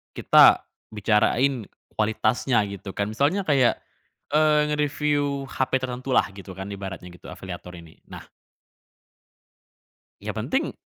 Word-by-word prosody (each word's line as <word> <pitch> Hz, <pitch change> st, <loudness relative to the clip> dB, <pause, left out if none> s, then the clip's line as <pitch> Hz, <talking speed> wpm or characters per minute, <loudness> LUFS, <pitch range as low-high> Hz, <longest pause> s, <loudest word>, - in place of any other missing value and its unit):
kita -, -, +6 dB, 0.3 s
bicarain 110 Hz, +3 st, +1 dB, 0.3 s
kualitasnya, 110 Hz, +2 st, +1 dB
gitu 100 Hz, 0 st, -8 dB
kan. 100 Hz, +1 st, -2 dB
Misalnya, 145 Hz, -, +1 dB
kayak, 140 Hz, -7 st, +3 dB, 0.5 s
eee, 150 Hz, 0 st, +4 dB
ngereviu 145 Hz, -1 st, 0 dB
HP 130 Hz, 0 st, -2 dB
tertentu, 130 Hz, +1 st, -3 dB
lah, -, -, +4 dB
gitu 95 Hz, -1 st, -11 dB
kan, 95 Hz, +1 st, -7 dB
ibaratnya 95 Hz, -2 st, -7 dB
gitu, 90 Hz, -, -14 dB
afiliator 90 Hz, -1 st, -9 dB
ini. 85 Hz, -2 st, -14 dB
Nah -, -, -10 dB, 2.0 s
yang -, -, -5 dB
penting -, -, -2 dB
120 Hz, 115 wpm, -24 LUFS, 100-140 Hz, 2.0 s, kita